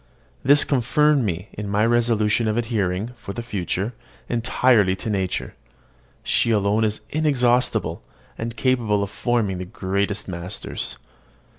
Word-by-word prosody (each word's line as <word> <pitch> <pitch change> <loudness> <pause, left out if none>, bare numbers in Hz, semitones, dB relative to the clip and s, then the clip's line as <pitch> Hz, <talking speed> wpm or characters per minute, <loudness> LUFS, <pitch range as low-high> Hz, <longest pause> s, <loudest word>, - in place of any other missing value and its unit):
This 145 +2 +6
confirmed 145 +2 +2
me 90 -2 -3
in 105 -1 -5
my 105 +2 +2
resolution 115 -2 +2
of 110 +1 0
adhering, 110 -3 -1
for 100 -4 -7
the 120 - -5
future, 105 0 -2 0.4
entirely 115 -4 +3
to 110 +3 -4
nature. 95 -3 -2 0.7
She - - +2
alone 105 0 +2
is 110 -1 -1
inexhaustible, 125 -5 +1 0.3
and 115 0 -5
capable 115 -5 +1
of 100 - -5
forming 110 -6 0
the 90 - -4
greatest 100 +3 -2
masters. 90 +1 -4
110 Hz, 130 wpm, -23 LUFS, 100-120 Hz, 0.7 s, This